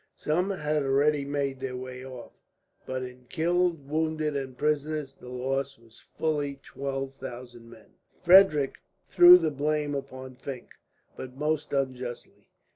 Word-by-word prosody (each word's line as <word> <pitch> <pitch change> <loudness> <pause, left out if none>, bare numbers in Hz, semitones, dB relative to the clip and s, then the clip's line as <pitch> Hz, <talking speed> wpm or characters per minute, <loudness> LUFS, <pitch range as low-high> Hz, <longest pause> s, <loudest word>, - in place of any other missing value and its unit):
Some 175 +6 0
had 155 -5 -1
already 140 +1 +2
made 140 -2 -2
their 130 -1 -4
way 130 0 -7
off, 130 -2 -10 0.6
but 130 0 -3
in 125 0 -10
killed, 170 -3 0
wounded, 155 0 -1
and 130 -2 -4
prisoners, 150 -1 -1
the 125 - -13
loss 135 +2 -2
was 115 -1 -21
fully 145 -3 -1
twelve 135 -1 -4
thousand 120 -2 -9
men. 110 -1 -16 0.3
Frederick 175 -6 +6 0.3
threw 175 0 +9
the 165 -3 0
blame 150 +1 -1
upon 130 -2 -7
Fink, 130 -2 -8 0.5
but 130 -1 -8
most 150 +1 -1
unjustly. 130 -3 -4
140 Hz, 135 wpm, -27 LUFS, 130-155 Hz, 0.6 s, threw